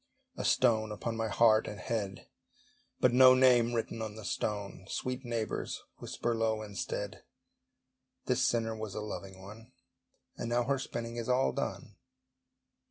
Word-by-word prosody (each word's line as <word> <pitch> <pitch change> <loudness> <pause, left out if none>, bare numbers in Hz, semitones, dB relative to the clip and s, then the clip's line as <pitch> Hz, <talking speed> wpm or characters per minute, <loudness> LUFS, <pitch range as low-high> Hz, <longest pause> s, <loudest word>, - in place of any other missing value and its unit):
A - - -4
stone 110 -4 +3
upon 115 +2 -3
my 115 0 -1
heart 110 0 +4
and 105 - -6
head, 100 -1 -3 0.7
But 125 - +4
no 130 0 +8
name 125 -2 +5
written 115 0 -2
on 110 -1 -4
the 110 -2 -9
stone! 100 -3 -3
Sweet 130 +1 -3
neighbours, 115 -3 -3
whisper 120 - -2
low 110 -1 0
instead, 105 -3 -5 1.0
"This - - +1
sinner 115 -1 +1
was 110 -2 -6
a 105 - -3
loving 95 -2 -7
one, 110 +6 -12 0.6
And 115 - -3
now 120 +1 +2
her 135 +2 0
spinning 120 -2 -5
is 115 +1 -4
all 125 +1 +3
done." - - -4
115 Hz, 150 wpm, -32 LUFS, 105-120 Hz, 1.0 s, no